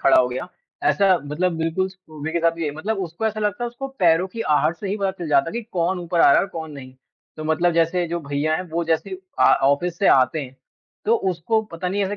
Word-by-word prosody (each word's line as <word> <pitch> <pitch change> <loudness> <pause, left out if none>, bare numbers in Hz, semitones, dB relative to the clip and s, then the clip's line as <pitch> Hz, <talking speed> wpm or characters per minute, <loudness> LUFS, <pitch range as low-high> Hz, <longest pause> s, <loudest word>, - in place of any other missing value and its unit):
खड़ा 135 - +5
हो 125 - +1
गया। 130 +8 -5 0.4
ऐसा 195 -2 +4
मतलब 175 +5 -1
बिल्कुल 165 +4 0
स्कूबी 160 -5 -8
के 170 - +1
साथ 165 0 +4
भी 165 0 -6
यही 150 - 0
मतलब 205 +6 -2
उसको 180 +4 -3
ऐसा 215 0 -2
लगता 210 +3 -1
है, - - -1
उसको 240 +3 -6
पैरों 175 0 +4
की 230 +4 -7 0.2
आहट 165 +3 +1
से 200 - -6
ही 200 - -1
पता 195 -2 0
चल 175 -4 -7
जाता 145 +2 +3
है - - -10
कि 235 - -3
कौन 180 +1 0
ऊपर 170 -1 -1
आ - - +7
रहा 140 - +7
है - - +5
और - - -1
कौन 160 -2 -6
नहीं? 130 -2 -10 0.4
तो 155 - -6
मतलब 165 +2 +2
जैसे 170 +2 +1
जो 170 - -2
भैया 145 +2 -1
हैं, 180 - -3
वो 170 +1 -1
जैसे 165 +4 0 0.3
अ, - - +4 0.2
ऑफ़िस 155 +6 +1
से 200 - +2
आते 135 +4 +4
हैं, 135 -2 -9 0.5
तो 225 - +3 0.2
उसको 185 +6 0
पता 175 +2 -3
नहीं 200 +2 0
ऐसे 200 +2 -3
170 Hz, 260 wpm, -22 LUFS, 155-190 Hz, 0.5 s, आ